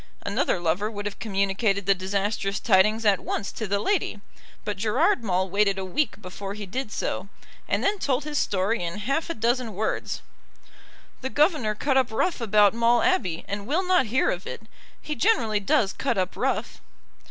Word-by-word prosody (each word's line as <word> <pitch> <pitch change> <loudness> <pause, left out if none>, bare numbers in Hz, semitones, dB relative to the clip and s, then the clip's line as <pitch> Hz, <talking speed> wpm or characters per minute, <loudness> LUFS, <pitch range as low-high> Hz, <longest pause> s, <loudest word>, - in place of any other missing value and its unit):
Another - - 0
lover 175 +5 0
would 205 -2 -6
have 205 - -5
communicated 200 -1 0
the 195 - +5
disastrous 195 +1 -2
tidings 215 +2 +3
at 200 -2 +4
once 200 - -3
to 220 - -5
the 200 +1 +1
lady; 275 - 0 0.5
but 210 - -2
Gerard 245 - +2
Maule 190 -2 +1
waited 200 +1 +2
a 190 - -3
week 205 +5 -1
before 195 0 -7
he 210 -1 -6
did 245 +4 -4
so, 185 - -3 0.4
and - - 0
then 405 0 +1
told 270 -3 0
his 300 -1 -1
story 195 +2 0
in 170 +3 -3
half 275 +11 -1
a - - -2
dozen 235 -1 0
words. 215 +3 -2 1.0
"The 260 - -3
governor 290 - +2
cut 270 +4 +1
up 260 -2 +3
rough 245 +6 0
about 210 -2 +4
Maule 235 +4 +3
Abbey, 210 - +1
and 200 +1 -4
will 340 +8 +1
not 360 -9 +3
hear 250 +5 +2
of 180 +2 -5
it. - - -7 0.4
He 300 - -5
generally 260 - +2
does 195 0 +2
cut - - -1
up 185 -1 -1
rough." - - -2
210 Hz, 185 wpm, -25 LUFS, 195-255 Hz, 1.0 s, the